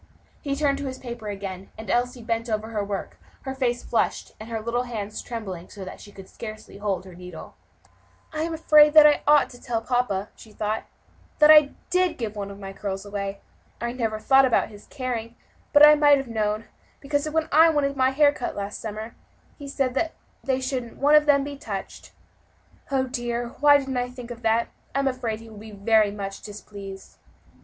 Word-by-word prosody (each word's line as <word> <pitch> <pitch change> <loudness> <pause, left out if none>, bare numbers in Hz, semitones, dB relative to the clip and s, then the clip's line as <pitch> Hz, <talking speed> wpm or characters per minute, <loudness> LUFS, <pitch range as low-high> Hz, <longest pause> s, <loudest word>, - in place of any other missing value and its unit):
He 275 -1 -2
turned 280 -1 +1
to 285 - -4
his 260 0 -5
paper 235 -4 -7
again, 195 -2 -6
and 220 - -8
Elsie 245 +3 0
bent 230 0 -2
over 215 0 -2
her 215 -2 -2
work, 200 -1 -5 0.2
her 265 - -4
face 250 -2 -1
flushed, - - -1
and 215 +2 -9
her 225 -1 -2
little 235 +2 -1
hand 215 -4 -5
trembling 195 -7 -6
so 195 -2 -9
that 185 - -9
she 205 - -13
could 195 -1 -12
scarcely 215 -2 -9
hold 200 -3 -2
her 185 - -11
needle. 180 -1 -10 0.8
"I'm 315 +2 -2
afraid 305 -1 +5
I 300 -1 +8
ought 295 0 +5
to 245 - -14
tell 235 -3 -1
papa," 225 -4 -1
she 220 - -15
thought, 215 +1 -2 0.5
"that 305 0 +8
I 300 -2 +7 0.2
did 360 -2 +2
give 220 -3 -4
one 200 -1 -4
of 200 - -9
my 195 -1 -8
curls 195 0 -5
away. 200 -1 -4 0.4
I 235 0 -2
never 225 -3 -2
thought 270 +5 +5
about 255 -3 +2
his 205 -1 -14
caring, 240 -4 -4 0.4
but 295 0 +9
I 300 - +9
might 295 -1 +6
have 270 -1 -4
known, 215 -1 -1 0.3
because 285 +1 -1
when 320 +1 0
I 320 +2 +7
wanted 285 -3 +1
my 260 -1 +3
hair 285 +2 +4
cut 250 - -4
last 200 0 -5
summer, 220 +1 -6 0.5
he 285 - -8
said 275 +3 -1 0.3
they 265 -1 0
shouldn't 255 -3 -4
one 290 +2 +3
of 300 0 +6
them 280 -1 +5
be 285 0 -6
touched. 200 -7 -7 0.8
Oh! 270 -1 +1
dear, 240 -2 -3
why 290 0 +7
didn't 270 -2 -3
I 245 0 -1
think 250 -1 -9
of 240 0 -8
that? 225 +1 +1 0.3
I - - +2
am 275 - 0
afraid 240 -4 -2
he 225 - -12
will 210 - -11
be 220 +1 -10
very 215 +1 +3
much 195 -1 -6
displeased." 200 -2 -10
235 Hz, 200 wpm, -25 LUFS, 210-275 Hz, 0.8 s, but